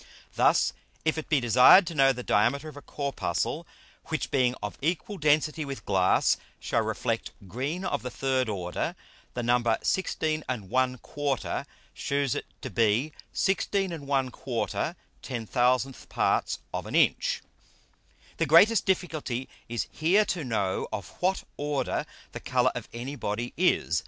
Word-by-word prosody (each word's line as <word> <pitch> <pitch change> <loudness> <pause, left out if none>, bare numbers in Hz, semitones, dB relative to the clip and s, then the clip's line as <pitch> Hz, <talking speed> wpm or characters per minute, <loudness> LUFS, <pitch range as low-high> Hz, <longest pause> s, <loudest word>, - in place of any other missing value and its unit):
Thus - - +3 0.3
if 160 0 +1
it 155 - -8
be 150 - +4
desired 125 - +7
to 170 - -4
know 135 -3 +5
the 125 -1 -5
diameter 120 +10 +2
of 155 - -9
a 145 - -9
Corpuscle, 145 +3 -2 0.4
which 155 -1 -3
being 125 -2 +2
of 105 -3 -6
equal 175 +6 -2
density 155 +1 +2
with 140 -1 -7
Glass 95 -2 +3 0.2
shall - - 0
reflect - - -2 0.2
green 140 - -3
of - - -1
the 125 - -4
third 130 -1 0
Order; 90 -4 -3 0.4
the 120 - -2
Number 120 -1 +2
16 155 -4 0
1/4 130 +4 -1 0.3
shews 140 -2 0
it - - -4 0.2
to - - -5
be 115 +6 +2 0.2
(16 195 0 0
1/4)/10000 130 - -2
parts - - +1 0.2
of - - -3
an - - -4
Inch. - - +2 0.9
The 165 - +1
greatest 200 +9 +6
difficulty 155 -9 -1 0.2
is 120 0 -1
here 185 +7 +3
to 175 -5 -2
know 100 -7 -1
of 105 -2 -5
what 190 +1 +1
Order 145 -1 -1 0.2
the - - -6
Colour - - +2
of - - -6
any 125 +5 -5
Body 120 -1 -3
is. 155 - +2
135 Hz, 140 wpm, -28 LUFS, 120-155 Hz, 0.9 s, desired